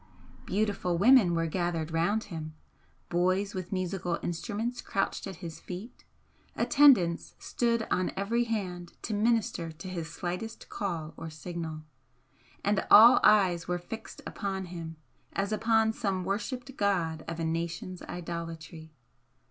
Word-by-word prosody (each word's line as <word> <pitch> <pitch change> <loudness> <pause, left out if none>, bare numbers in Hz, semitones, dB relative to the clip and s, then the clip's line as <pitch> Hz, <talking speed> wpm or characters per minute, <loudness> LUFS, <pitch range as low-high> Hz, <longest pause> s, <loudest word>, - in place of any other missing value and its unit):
Beautiful 200 -4 0
women 205 -3 +6
were 165 0 +1
gathered 165 -1 -1
round 200 +7 +1
him, 155 -5 -7 0.5
boys 185 +3 +1
with 185 -2 -5
musical 185 -2 -1
instruments 220 +7 -3
crouched 195 +1 -2
at 190 - -6
his 165 -1 -7
feet 190 +7 -9 0.5
attendants 260 - +4
stood 235 -2 0
on 185 0 +1
every 230 +5 +1
hand 180 -6 -4
to 220 - -3
minister 210 -6 +1
to 170 +4 -10
his 170 -3 -5
slightest 180 +7 -5
call 170 -7 -3
or 160 - -6
signal, 160 -1 -6 0.8
and 205 -1 +2
all 230 +3 +10
eyes 190 -5 +4
were 180 0 0
fixed 220 +6 -8
upon 195 -2 -3
him 165 -2 -6 0.4
as 195 +1 -1
upon 220 0 +3
some 195 -5 -1
worshipped 245 +7 -3
god 170 -6 0
of 165 0 -4
a 165 - -1
nation's 170 +2 -3
idolatry. 165 -2 -7
185 Hz, 130 wpm, -29 LUFS, 170-210 Hz, 0.8 s, all